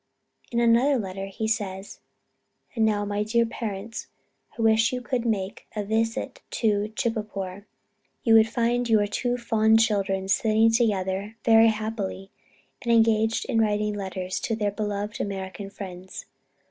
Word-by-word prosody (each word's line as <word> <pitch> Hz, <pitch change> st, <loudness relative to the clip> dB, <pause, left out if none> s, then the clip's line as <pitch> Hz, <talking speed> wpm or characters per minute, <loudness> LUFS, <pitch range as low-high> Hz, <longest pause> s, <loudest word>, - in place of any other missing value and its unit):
In 235 Hz, -, 0 dB
another 235 Hz, +4 st, +4 dB
letter 195 Hz, -3 st, -4 dB
he 205 Hz, +3 st, -3 dB
says, 200 Hz, -3 st, -3 dB, 0.7 s
"And 225 Hz, -, +1 dB
now, 210 Hz, -1 st, +2 dB
my 205 Hz, 0 st, -2 dB
dear 230 Hz, +2 st, +2 dB
parents, 225 Hz, -1 st, -5 dB, 0.5 s
I 230 Hz, -, -1 dB
wish 225 Hz, +1 st, +4 dB
you 255 Hz, -, -2 dB
could 245 Hz, -1 st, -2 dB
make 200 Hz, -3 st, -2 dB
a 210 Hz, -, -1 dB
visit 225 Hz, +5 st, -1 dB
at -, -, -40 dB, 0.5 s
Chitpore. 205 Hz, -4 st, -3 dB, 0.6 s
You 230 Hz, -, +4 dB
would 220 Hz, 0 st, +6 dB
find 240 Hz, +1 st, 0 dB
your 215 Hz, -2 st, +4 dB
two 245 Hz, +4 st, -1 dB
fond 225 Hz, -2 st, +3 dB
children 195 Hz, -3 st, +1 dB
sitting 220 Hz, +3 st, +3 dB
together 205 Hz, -2 st, 0 dB
very 225 Hz, 0 st, +7 dB
happily, 215 Hz, -3 st, -3 dB, 0.5 s
and 235 Hz, -, -1 dB
engaged 225 Hz, -1 st, +3 dB
in 225 Hz, -, +1 dB
writing 210 Hz, -1 st, +1 dB
letters 190 Hz, -2 st, -4 dB
to 225 Hz, -, -2 dB
their 210 Hz, -2 st, -1 dB
beloved 205 Hz, 0 st, -3 dB
American 195 Hz, -1 st, -5 dB
friends. 185 Hz, -2 st, -8 dB
215 Hz, 145 wpm, -25 LUFS, 200-225 Hz, 0.7 s, very